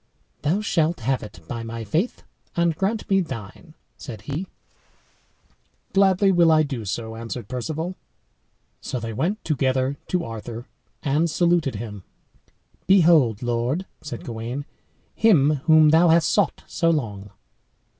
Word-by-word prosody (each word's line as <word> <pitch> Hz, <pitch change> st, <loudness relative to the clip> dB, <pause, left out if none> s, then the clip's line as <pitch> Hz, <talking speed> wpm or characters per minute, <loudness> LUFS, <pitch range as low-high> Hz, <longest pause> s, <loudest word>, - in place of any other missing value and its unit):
"Thou 170 Hz, +8 st, +1 dB
shalt 170 Hz, -, 0 dB
have 130 Hz, +3 st, 0 dB
it, 105 Hz, -5 st, -10 dB
by 120 Hz, -1 st, -4 dB
my 115 Hz, 0 st, -6 dB
faith; 165 Hz, -, -1 dB, 0.3 s
and 170 Hz, -1 st, +2 dB
grant 205 Hz, +6 st, -1 dB
me 195 Hz, -2 st, +3 dB
thine," 130 Hz, -, -8 dB, 0.2 s
said 115 Hz, -7 st, -8 dB
he. 145 Hz, -, -4 dB, 1.5 s
"Gladly 195 Hz, 0 st, +4 dB
will 170 Hz, -3 st, +5 dB
I 155 Hz, 0 st, +5 dB
do 130 Hz, -7 st, -4 dB
so," 110 Hz, +3 st, -4 dB
answered 115 Hz, -1 st, -6 dB
Perceval. 155 Hz, -, -4 dB, 0.9 s
So 125 Hz, -, -4 dB
they 115 Hz, -1 st, -5 dB
went 185 Hz, -, -2 dB
together 135 Hz, -2 st, 0 dB
to 180 Hz, -2 st, 0 dB
Arthur, 115 Hz, +1 st, -7 dB, 0.4 s
and 150 Hz, +4 st, +1 dB
saluted 170 Hz, -5 st, +2 dB
him. 105 Hz, -2 st, -6 dB, 0.9 s
"Behold, 160 Hz, -, +5 dB
lord," 120 Hz, +9 st, -1 dB, 0.2 s
said 135 Hz, -6 st, -7 dB
Gawain, 120 Hz, +4 st, -5 dB, 0.5 s
"him 155 Hz, -9 st, +4 dB
whom 155 Hz, -1 st, +7 dB
thou 165 Hz, +3 st, +5 dB
hast 165 Hz, 0 st, +4 dB
sought 205 Hz, -, +1 dB
so 165 Hz, -, 0 dB
long." 105 Hz, -11 st, -2 dB
145 Hz, 135 wpm, -23 LUFS, 115-170 Hz, 1.5 s, whom